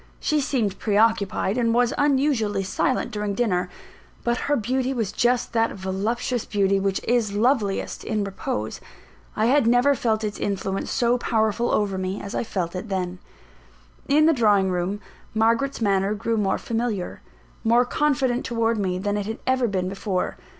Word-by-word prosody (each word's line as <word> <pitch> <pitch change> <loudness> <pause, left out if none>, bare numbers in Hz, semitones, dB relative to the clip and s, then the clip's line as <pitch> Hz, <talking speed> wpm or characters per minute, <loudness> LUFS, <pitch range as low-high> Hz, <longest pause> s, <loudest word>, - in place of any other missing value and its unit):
She 305 -1 +1
seemed 230 -8 -1
pre 205 -2 0
occupied, 215 0 +2
and 230 -1 +2
was 245 0 +3
unusually 265 -8 +1
silent 255 +6 -1
during 210 -1 -2
dinner; 185 -6 0 0.5
but 240 0 +1
her 290 - +4
beauty 260 +2 -1
was 220 -5 -1
just 245 +3 +1
that 225 0 +2
voluptuous 210 +6 -2
beauty 195 -1 +1
which 195 0 0
is 230 -4 +1
loveliest 215 -3 0
in 215 -2 -1
repose. 110 - -4 0.5
I 215 - +1
had 255 0 +3
never 245 +4 +4
felt 225 -4 0
its 210 -1 -3
influence 195 -1 -2
so 240 +1 +1
powerful 220 0 +1
over 200 -2 0
me 185 +2 -3
as 200 - -7
I - - -1
felt 185 -6 -3
it 195 +4 -5
then. 185 -2 -2 0.9
In 300 +2 +4
the 325 - +5
drawing 205 -7 +3
room, 180 +3 -1 0.4
Margaret's 230 +5 +1
manner 200 -1 +2
grew 225 +3 -1
more 205 -3 +1
familiar, 225 -5 -3 0.4
more 235 +2 +4
confident 260 -2 +1
towards 230 -1 0
me 185 -2 -1
than 205 +2 -1
it 205 -1 -3
had 220 +1 -4
ever 260 -1 +2
been 185 -3 -1
before. 190 -1 -2
220 Hz, 165 wpm, -24 LUFS, 195-245 Hz, 0.9 s, the